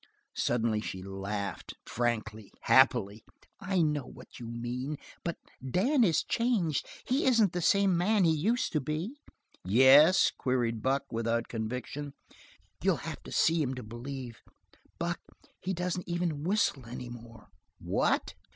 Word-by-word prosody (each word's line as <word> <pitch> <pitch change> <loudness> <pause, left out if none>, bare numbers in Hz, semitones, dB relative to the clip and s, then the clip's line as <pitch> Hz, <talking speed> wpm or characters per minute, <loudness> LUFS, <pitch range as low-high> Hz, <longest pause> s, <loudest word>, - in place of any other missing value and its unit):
Suddenly 115 -3 0
she 95 -3 -6
laughed, 100 +1 -5
frankly, 110 -3 -2
happily. 115 -5 +4 0.4
"I 190 -3 +1
know 150 -4 -1
what - - -13
you 120 - -7
mean, 120 +5 -4 0.3
but 170 - -3 0.3
Dan 235 - +2
is 170 -7 +3
changed; 225 - 0 0.2
he 260 +3 +1
isn't 225 -8 +4
the 180 - -1
same 200 +1 +3
man 200 +4 +3
he 165 - +4
used 220 +11 0
to 155 - 0
be." 160 - -4 0.4
"Yes?" 135 - +6
queried 120 -3 -1
Buck, 135 +3 +1
without 115 0 -1
conviction. 125 +5 -5 0.7
"You'll - - +3
have - - -6
to - - -11
see 165 0 +3
him 130 -3 -1
to 125 - -7
believe; 120 +2 -7 0.6
Buck, - - -2 0.4
he 185 - -3
doesn't 180 0 -3
even 170 -4 -1
whistle 175 - +1
any 125 +1 -7
more." 115 -3 -12 0.3
"What?" 90 +2 0
135 Hz, 140 wpm, -30 LUFS, 115-175 Hz, 0.7 s, Yes